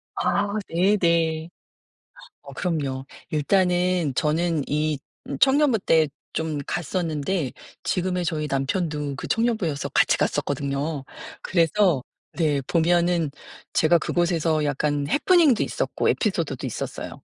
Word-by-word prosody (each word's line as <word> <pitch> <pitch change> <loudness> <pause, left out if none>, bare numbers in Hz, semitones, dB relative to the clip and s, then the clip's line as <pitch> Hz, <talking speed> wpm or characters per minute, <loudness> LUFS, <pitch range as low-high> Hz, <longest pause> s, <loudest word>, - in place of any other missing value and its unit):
아 200 0 +1 0.2
네네. 170 -3 +2 0.9
어 - - -11
그럼요. 140 -7 -2 0.2
일단은 180 -1 +1
저는 160 0 +1
이 150 -1 0 0.3
음 140 - -3
청년부 270 -4 +4
때 160 -4 +3 0.3
좀 160 -2 -2
갔었는데 165 -3 -2 0.3
지금의 180 -1 -1
저희 155 -2 -1
남편도 145 0 -1
그 - - -6
청년부여서 220 -11 0
같이 - - +3
갔었거든요. 140 +1 -1 0.4
그래서 170 -4 +2 0.3
네 150 -4 +1
보면은 170 -2 +2 0.4
제가 165 +2 +4
그곳에서 165 -2 0
약간 145 0 0
해프닝도 310 - +4
있었고 - - -1
에피소드도 - - -1
있었어요. - - -6
165 Hz, 260 characters per minute, -24 LUFS, 150-180 Hz, 0.9 s, 청년부